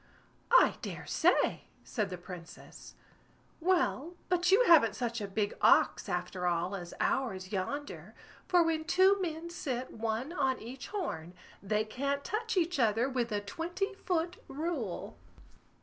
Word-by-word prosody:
"I - - +6
dare - - -6
say!" - - +2 0.2
said 210 -5 -2
the 180 - -5
Princess. 175 -1 -11 0.6
"Well, 345 -2 +1
but 360 0 +2
you 420 +6 +6
haven't 305 - +6
such 235 -2 -2
a 205 - -3
big 205 +1 -1
ox, - - +4
after 180 0 -2
all, 175 +3 0
as 175 -3 -7
ours 190 -8 -1
yonder; 280 +10 -4 0.3
for 355 -2 +5
when 320 -1 0
two 380 +3 +4
men 335 -1 -4
sit 260 -7 -4
one 225 +7 -2
on 265 -5 +1
each 255 +4 -8
horn, 185 - -4 0.3
they 210 +2 0
can't 280 +5 -2
touch 450 +1 -2
each 350 -3 +1
other 230 +1 +3
with 250 -3 -1
a 205 -1 0
twenty 345 - -3
foot 355 -2 -2
rule." 280 - -4
265 Hz, 145 wpm, -31 LUFS, 205-345 Hz, 0.6 s, I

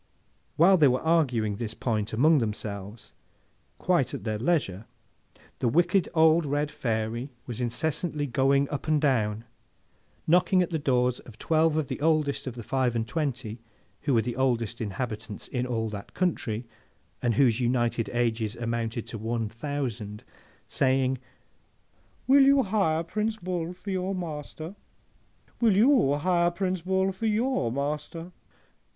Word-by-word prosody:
While 185 +4 +6
they 150 -4 +6
were 125 0 +1
arguing 125 -11 +1
this 110 -1 -4
point 110 -3 -1
among 150 +7 +4
themselves 105 -1 -5 0.6
quite - - +1
at - - -7
their 110 -1 -2
leisure, 115 - 0 0.7
the 125 - +1
wicked 175 - +2
old 160 +1 +5
red 145 +1 -1
Fairy 115 +2 -2 0.2
was 120 -1 -5
incessantly 150 +5 -1
going 140 +2 +2
up 145 +1 -4
and 155 -1 +3
down, 115 -6 +1 0.8
knocking 180 +2 +4
at 175 - -5
the 160 - -1
doors 125 -3 +1
of 110 -3 -14
twelve 160 +2 +2
of 155 -3 0
the - - -5
oldest 155 -3 +1
of 125 - -4
the 120 - -7
five 130 0 0
and 115 -1 -1
twenty, 125 -8 -3 0.4
who 140 -3 +1
were 115 - +3
the 120 +1 -3
oldest 120 -3 0
inhabitants 110 0 -5
in 125 -1 -2
all 115 -2 -1
that 100 -1 -8
country, 125 -11 -1 0.6
and 120 -2 +1
whose 125 -3 +3
united 120 -2 0
ages 115 -2 -1
amounted 115 -1 -3
to 115 - -7
one 115 0 -2
thousand, 115 -4 -4 0.4
saying, 130 -1 +1 1.1
'Will 275 +2 +6
you 275 0 +5
hire 190 -6 +1
Prince 215 +5 -2
Bull 175 -3 -3
for 185 +2 -7
your 190 +1 -1
master?—Will 175 +6 -5
you 235 - +5
hire 175 +3 +2
Prince 185 0 -2
Bull 190 +2 +1
for 195 +4 -3
your 220 - +1
master? 150 +5 -4
135 Hz, 145 wpm, -27 LUFS, 115-170 Hz, 1.1 s, While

